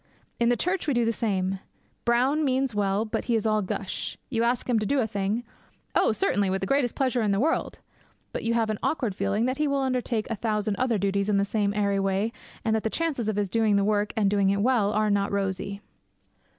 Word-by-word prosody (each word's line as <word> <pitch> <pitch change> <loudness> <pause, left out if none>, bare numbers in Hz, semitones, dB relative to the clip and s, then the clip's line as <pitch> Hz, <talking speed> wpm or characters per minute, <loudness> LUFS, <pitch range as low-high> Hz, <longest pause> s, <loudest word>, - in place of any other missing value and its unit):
In 235 0 +3
the 245 - +2
church 360 +3 -1
we 285 - +1
do 240 -1 +2
the 230 - +1
same. 195 -4 -1 0.5
Brown 255 +6 +2
means 265 -2 +1
well, 205 +1 +1
but 215 - -3
he 235 - +1
is 225 -1 0
all 215 -1 +2
gush. 190 - -4
You 230 -3 0
ask 235 +1 0
him 240 -3 +2
to 215 - -2
do 280 - +2
a 240 - +2
thing. 205 +2 -2 0.5
'Oh, - - +3
certainly, 205 - +1
with 190 +1 -1
the - - 0
greatest 275 0 +1
pleasure 255 -3 +1
in 215 - +1
the 200 0 +2
world!' 315 +7 0 0.6
But - - -3
you 230 0 +1
have 225 -2 +1
an 215 - -4
awkward 245 -10 0
feeling 200 +4 0
that 255 +1 -1
he 300 - +2
will 280 -1 +1
undertake 250 -4 -1
a - - 0
thousand 210 -1 -1
other 250 -3 +1
duties 200 +1 0
in 205 - +3
the 200 - +2
same 205 -1 0
airy 200 -1 +1
way, 195 +3 0 0.3
and 220 -1 +2
that 220 - +1
the 220 - -1
chances 280 -7 -1
of 215 - -1
his 205 -1 0
doing 220 +1 +2
the 200 - +3
work, 205 0 +1
and 210 -2 +3
doing 200 -1 +3
it 200 +1 +1
well, 235 -5 +3
are 215 0 +1
not 200 0 +1
rosy. 200 0 -2
215 Hz, 240 wpm, -26 LUFS, 200-245 Hz, 0.6 s, In